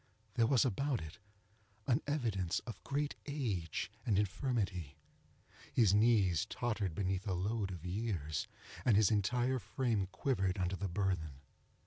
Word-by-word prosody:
There 115 -2 +3
was 130 -2 +4
about 130 +2 0
it 80 +7 -9 0.7
an 130 +3 +2
evidence 110 - 0
of 115 - -9
great 145 +1 -1
age 110 - -2
and 105 -4 +2
infirmity. 100 - -1 0.8
His 110 -5 +5
knees 105 -6 +4
tottered 105 -8 -2
beneath 95 0 -1
a 95 - +1
load 100 +2 -1
of 90 -3 -7
years, 90 -7 -2 0.4
and 115 -5 +5
his 110 0 +5
entire 125 +5 +2
frame 115 -7 0
quivered 95 -1 0
under 90 0 0
the 95 +1 -3
burthen. 85 -7 -1
100 Hz, 135 wpm, -35 LUFS, 90-120 Hz, 0.8 s, His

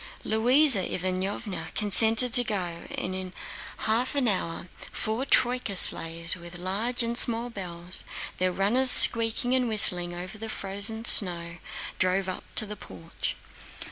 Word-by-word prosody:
Louisa 245 +3 0
Ivánovna 185 0 -6
consented 225 +3 +2
to 245 - +6
go, 180 -6 -7
and 185 - -7
in 185 -1 -8 0.5
half 235 +5 -2
an 275 -3 -2
hour 175 -4 -5 0.2
four 220 +5 -6
troyka 245 -6 -1
sleighs 165 -1 +4
with 175 0 -13
large 210 +7 -3
and 235 0 -5
small 235 0 -1
bells, 180 -3 -5 0.4
their 185 0 -2
runners 220 +8 0
squeaking 230 +1 +6
and 255 -2 -2
whistling 180 -5 +4
over 185 +4 -11
the 225 0 -10
frozen 205 +3 -4
snow, 170 -6 +4 0.4
drove 185 +1 -3
up 185 - -9
to 215 - +2
the 210 0 -11
porch. 90 - -10
200 Hz, 140 wpm, -23 LUFS, 180-230 Hz, 0.5 s, to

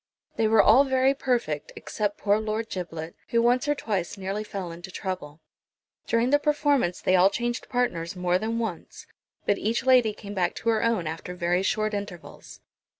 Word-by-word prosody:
They 225 - +2
were 220 0 +5
all 245 +6 +7
very 265 0 +2
perfect, 240 - -2
except 205 -1 -3
poor 205 0 +2
Lord 220 +1 -3
Giblet, 165 -3 -5
who 235 - +1
once 245 +3 +2
or 295 - +2
twice 205 -9 -3
nearly 195 +2 -3
fell 195 -4 -6
into 175 +3 -9
trouble. 180 -5 -6 0.7
During 230 +2 +2
the 290 - +5
performance 290 - +1
they 185 - +2
all 185 +1 +6
changed 240 +3 -3
partners 195 -10 -1
more 180 0 +1
than 225 +2 -2
once, 220 -8 -5 0.4
but 205 - +1
each 230 +4 -1
lady 250 -4 +5
came 205 -1 -9
back 185 -3 0
to 230 - -2
her 225 -1 +2
own 230 -7 +1
after 165 +3 -5
very 175 +1 +1
short 215 +2 0
intervals. 200 -4 -8
210 Hz, 180 wpm, -26 LUFS, 180-235 Hz, 0.7 s, all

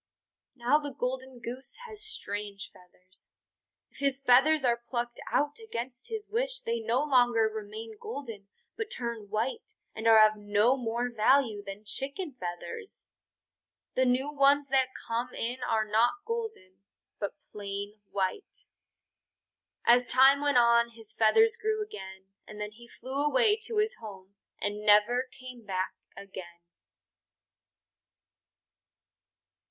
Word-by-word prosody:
Now 255 +4 +3
the 285 -3 -6
Golden 260 +1 -3
Goose 245 +3 -7
has 430 -3 -6
strange 205 - -5
feathers. 185 +1 -16 0.6
If - - -16
his 275 -1 +1
feathers 275 +3 +5
are 235 -1 +2
plucked 240 -1 -3
out 290 +5 +1
against 260 - -6
his 440 -2 -5
wish, - - -1
they 470 -1 -2
no 280 - +1
longer 245 -5 +4
remain 220 +1 -7
golden 235 - -7 0.3
but 445 -1 -4
turn 235 - -4
white 225 - -2 0.2
and 220 +1 -2
are 220 -1 +9
of 215 0 -5
no 210 +4 +3
more 240 -1 -2
value 230 -1 +3
than 200 +1 -8
chicken 280 - -4
feathers. 250 - -7 0.9
The 260 - +2
new 260 +3 +1
ones 280 0 +4
that 265 -1 +3 0.2
come 235 +2 -2
in 245 +3 -3
are 225 -3 +1
not 240 - +2
golden, 445 - -5 0.4
but 200 - -3 0.2
plain 205 0 -6
white. 195 - -3 1.2
As 245 +1 +5
time 270 +2 +6
went 285 -3 +2
on 235 0 +5
his 220 -1 -15
feathers 445 - +4
grew 435 -1 -1
again, 190 - -10 0.2
and 210 - -10
then 210 0 -4
he 235 +2 -15
flew 265 +4 -4
away 425 +8 +4
to 450 - -4
his 430 +2 +1
home 195 -3 -10 0.3
and 205 +1 -2
never 215 +5 +4
came 255 -2 -11
back 190 -2 -2 0.2
again. 185 -3 -10
240 Hz, 135 wpm, -29 LUFS, 210-285 Hz, 1.2 s, are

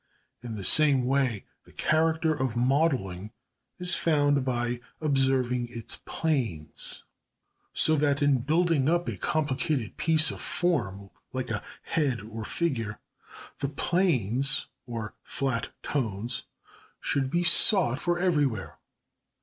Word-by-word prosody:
In 120 -2 -6
the 100 - -6
same 140 +3 +4
way 130 -5 0 0.2
#the - - -18
character 160 0 +1
of 130 -5 -2
modelling 125 - 0 0.4
is 180 0 +3
found 145 -4 +2
by 120 -1 -1 0.2
observing 130 -4 +1
its 115 -2 -5
planes#. 115 - -2 0.7
So 155 - +5
that 145 -1 +2
in 145 -3 +3
building 155 +1 +2
up 175 +1 +1
a - - -2
complicated 150 -4 -1
piece 160 -1 +3
of - - -7
form, 100 - -1 0.2
like 130 -2 -3
a 105 - -2 0.2
head 140 -9 0
or 110 +1 -7
figure, 115 -7 -2 0.6
the 140 - -1
planes 135 - +2 0.2
(or 115 -3 -5
flat 135 -4 -2
tones) 115 -3 -2 0.5
should 135 -2 -1
be 175 +5 0
sought 170 - +5
for 175 0 0
everywhere. 145 - 0
135 Hz, 120 wpm, -27 LUFS, 120-155 Hz, 0.7 s, So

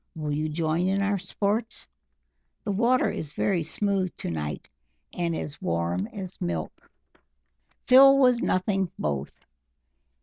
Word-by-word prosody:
Will 150 -2 -3
you 155 +2 -1
join 160 +3 0
in 195 +1 +1
our 200 0 0
sports? 210 +5 -2 0.8
The 210 - -2
water 235 +6 +2
is 150 -2 -6
very 190 -4 +1
smooth 190 +4 0
to - - -4
night, 75 -2 -4 0.5
and 170 -2 -1
as 145 -2 -6
warm 85 +3 -1
as 190 - -8
milk." 85 -2 -4 1.0
Phil 270 +2 +8
was 250 -3 +4
nothing 190 -1 0
both. 70 -2 -4
180 Hz, 130 wpm, -26 LUFS, 150-205 Hz, 1.0 s, Phil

